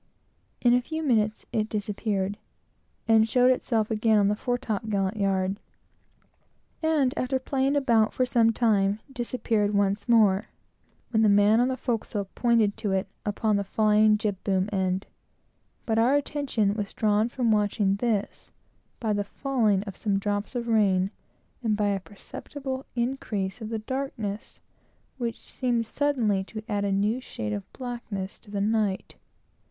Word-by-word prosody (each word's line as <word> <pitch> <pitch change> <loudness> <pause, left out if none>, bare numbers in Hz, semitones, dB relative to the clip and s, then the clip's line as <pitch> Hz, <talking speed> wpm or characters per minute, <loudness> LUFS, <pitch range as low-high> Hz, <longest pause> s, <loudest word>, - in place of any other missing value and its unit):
In 240 -1 +5
a 245 - +4
few 315 +5 -4
minutes 215 -6 +1
it 215 -1 0
disappeared, 205 -1 -2 0.7
and 225 0 +5
showed 250 +1 +5
itself 225 -3 0
again 220 0 +3
on 200 -1 +4
the 210 - +1
fore 245 +3 -1
top 220 -3 -3
gallant 195 0 0
yard; 195 0 0 1.2
and 310 -5 +2
after 260 +1 0
playing 270 +1 0
about 235 -6 +3
for 255 - +1
some 235 -2 +3
time, 210 -3 +2
disappeared 235 -4 0
again; 205 0 +3 0.7
when 220 -2 +3
the 215 - +5
man 205 +2 +5
on 245 - +3
the 260 0 -2
forecastle 225 -5 -2
pointed 230 -4 +2
to 205 - -2
it 190 0 +1 0.2
upon 210 0 +1
the 200 - 0
flying 215 +1 +3
jib 210 -3 -3
boom 190 -1 +1
end. 190 -1 0 0.8
But 225 -1 +1
our 245 +5 +4
attention 275 -8 0
was 205 -2 -4
drawn 215 +1 +2
from 240 -2 0
watching 205 -2 +2
this, 215 -2 -2 0.5
by 220 -3 0
the 205 0 0
falling 220 -4 0
of 195 -3 -8
some 200 -1 0
drops 205 +3 -2
of 240 -1 -2
rain 195 -4 +2 0.5
and 220 -3 0
by 205 -1 +1
a 200 -1 0
perceptible 260 +7 -7
increase 235 -5 -2
of 220 - -5
the 225 - -2
darkness, 220 -3 -4 0.6
which 235 -2 -3
seemed 240 -3 -1
suddenly 225 -7 0
to 215 +1 -8
add 205 -1 -1
a 200 - 0
new 210 +6 +1
shade 105 - -5
of 100 -1 -6
blackness 235 -6 -6
to 220 - -19
the 200 -1 -2
night. 210 -2 0
215 Hz, 155 wpm, -26 LUFS, 200-240 Hz, 1.2 s, In